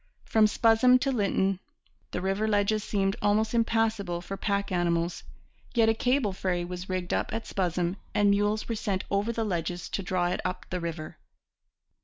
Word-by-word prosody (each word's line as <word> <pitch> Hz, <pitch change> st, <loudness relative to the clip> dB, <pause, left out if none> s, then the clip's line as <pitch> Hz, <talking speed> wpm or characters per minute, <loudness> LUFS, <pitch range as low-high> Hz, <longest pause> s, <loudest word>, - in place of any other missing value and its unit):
From 220 Hz, -1 st, +4 dB
Spuzzum 230 Hz, +4 st, +5 dB
to 275 Hz, -, +1 dB
Lytton 195 Hz, -4 st, +1 dB, 0.5 s
the 180 Hz, -, -4 dB
river 195 Hz, +3 st, 0 dB
ledges 210 Hz, 0 st, +2 dB
seemed 195 Hz, -2 st, 0 dB
almost 215 Hz, +2 st, +2 dB
impassable 225 Hz, -6 st, +1 dB
for 190 Hz, +3 st, -6 dB
pack 200 Hz, 0 st, -1 dB
animals; 170 Hz, -1 st, 0 dB, 0.5 s
yet 225 Hz, -2 st, +5 dB
a -, -, +4 dB
cable 245 Hz, -2 st, +1 dB
ferry 180 Hz, -2 st, -1 dB
was 180 Hz, +1 st, -7 dB
rigged 185 Hz, -1 st, -2 dB
up -, -, -1 dB
at 225 Hz, 0 st, -3 dB
Spuzzum 180 Hz, 0 st, -1 dB, 0.2 s
and 205 Hz, -1 st, +4 dB
mules 205 Hz, +1 st, +1 dB
were 230 Hz, -, -1 dB
sent 200 Hz, -3 st, -2 dB
over 205 Hz, +3 st, +1 dB
the 225 Hz, -1 st, -2 dB
ledges 175 Hz, -2 st, -3 dB
to -, -, -2 dB
draw 180 Hz, -1 st, 0 dB
it -, -, -2 dB
up 185 Hz, 0 st, -3 dB
the 180 Hz, -, -1 dB
river. 165 Hz, -2 st, -6 dB
200 Hz, 175 wpm, -28 LUFS, 180-220 Hz, 0.5 s, Spuzzum